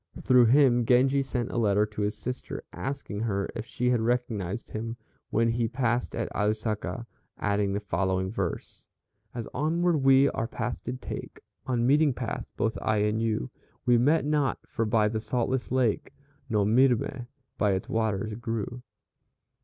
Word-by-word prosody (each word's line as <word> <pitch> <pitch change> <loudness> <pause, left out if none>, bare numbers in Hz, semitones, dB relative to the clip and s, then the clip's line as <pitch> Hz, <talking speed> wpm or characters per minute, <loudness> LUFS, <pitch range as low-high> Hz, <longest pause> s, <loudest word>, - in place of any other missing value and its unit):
Through 125 -2 +5
him 125 -1 +5
Genji 130 +4 +4
sent 125 -3 -3
a - - -1
letter 105 -1 +3
to 105 0 -6
his 105 +1 0
sister, 125 +3 -5
asking 135 -6 -4
her 100 -3 -1
if 115 0 -5
she 125 -1 0
had 120 -2 +2
recognized 115 -4 -2
him 115 +2 -4 0.3
when 115 +1 +2
he 115 0 +1
passed 120 0 -1
at 115 - -1
Ausaka, 110 +2 -1 0.3
adding 100 -1 0
the 100 - 0
following 95 0 -1
verse: 100 -5 -4 0.5
"As 115 -2 -4
onward 165 +4 +1
we 135 0 +5
our 115 - -3
way 125 - 0
did 125 +1 -5
take, - - -6 0.3
On 120 -2 +1
Meeting 145 0 +4
Path, 120 -2 -4
both 115 - 0
I 110 - +1
and 105 +2 +1
you, 110 - -1 0.3
We 120 -1 +5
met 145 +5 +3
not, 145 -2 +1
for 115 -6 -2
by 105 -1 +3
the 110 +1 -1
saltless 125 +2 -1
lake, 130 -5 +1 0.4
No 105 -3 +2
milme 125 +2 +2 0.3
by 105 -2 +3
its 95 - -2
waters 110 -1 -1
grew." 115 +1 -4
115 Hz, 160 wpm, -28 LUFS, 105-125 Hz, 0.5 s, Through